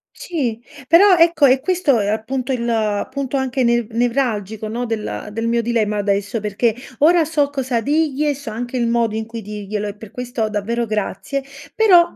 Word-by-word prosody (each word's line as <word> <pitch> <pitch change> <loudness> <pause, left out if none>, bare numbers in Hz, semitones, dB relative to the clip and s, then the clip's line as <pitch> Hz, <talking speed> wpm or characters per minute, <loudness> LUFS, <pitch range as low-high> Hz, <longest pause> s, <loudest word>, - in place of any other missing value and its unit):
Sì. 250 - -3 0.3
Però, 370 +4 +7
ecco 335 -3 +5
è 260 0 +5
questo, 350 -1 +1
uhm, 205 -3 0
appunto 250 +4 -2
il 225 -4 0
punto 275 0 -2
anche 265 0 0
ne 235 -1 +2
nevralgico, 225 -3 -1
no, 235 +3 -3
del 220 -2 -4
del 225 +2 -2
mio 235 0 +2
dilemma 220 -3 0
adesso, 200 +2 0
perché 210 +2 0 0.2
ora 330 +3 +5
so 295 -2 +1
cosa 260 -4 -1
digli 300 +2 +1
e 295 - +2
so 280 -3 -8
anche 240 +3 -4
il 235 -1 +1
modo 230 -2 +1
in 220 0 -2
cui 230 0 -7
dirglielo 210 0 -4
e 200 - -6
per 215 -1 -12
questo, 245 -3 -3
davvero, 230 +3 -1
grazie. 220 +6 -3 0.3
Però 360 -6 +5
235 Hz, 185 wpm, -19 LUFS, 215-275 Hz, 0.3 s, Però